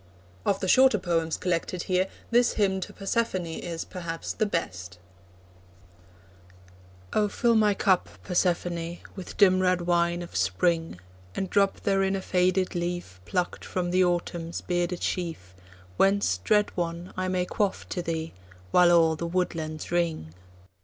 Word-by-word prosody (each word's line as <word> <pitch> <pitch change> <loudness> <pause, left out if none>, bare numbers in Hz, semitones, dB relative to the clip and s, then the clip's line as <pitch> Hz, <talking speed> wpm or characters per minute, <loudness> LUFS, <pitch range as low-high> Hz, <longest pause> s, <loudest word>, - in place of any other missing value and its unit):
Of 195 - +2
the 190 - -1
shorter 260 +2 +6
poems 165 -3 -1
collected 180 0 -2
here, 185 0 +1 0.2
this 240 +1 +4
Hymn 195 -3 +1
to 185 - -6
Persephone 195 -2 -1
is, 165 0 -5
perhaps, 170 -2 -5
the 215 - 0
best: 90 - -4 2.2
Oh, 210 -1 +3
fill 235 +3 +2
my 210 -2 +4
cup, 190 -3 +2
Persephone, 175 -1 -1 0.2
With 190 -3 -8
dim 185 -2 +5
red 180 -1 +2
wine 175 0 +1
of 170 - -11
Spring, 95 - 0 0.4
And 190 - -3
drop 200 -1 +2
therein 195 -1 +1
a 195 - -2
faded 185 0 +1
leaf 175 - -4
Plucked 180 -2 -2
from 175 -1 -2
the 185 +1 +4
Autumn's 175 -1 -2
bearded 175 0 -1
sheaf, 160 - -3 0.4
Whence, 195 - +3
dread 210 - +2
one, 170 0 -3
I 185 0 -2
may 185 -1 0
quaff 200 +1 -1
to 180 - -2
thee, 165 -1 -3 0.4
While 175 -1 +6
all 165 -2 +5
the 170 +2 -4
woodlands 165 -3 -2
ring. 165 - -1
175 Hz, 145 wpm, -27 LUFS, 170-190 Hz, 2.2 s, shorter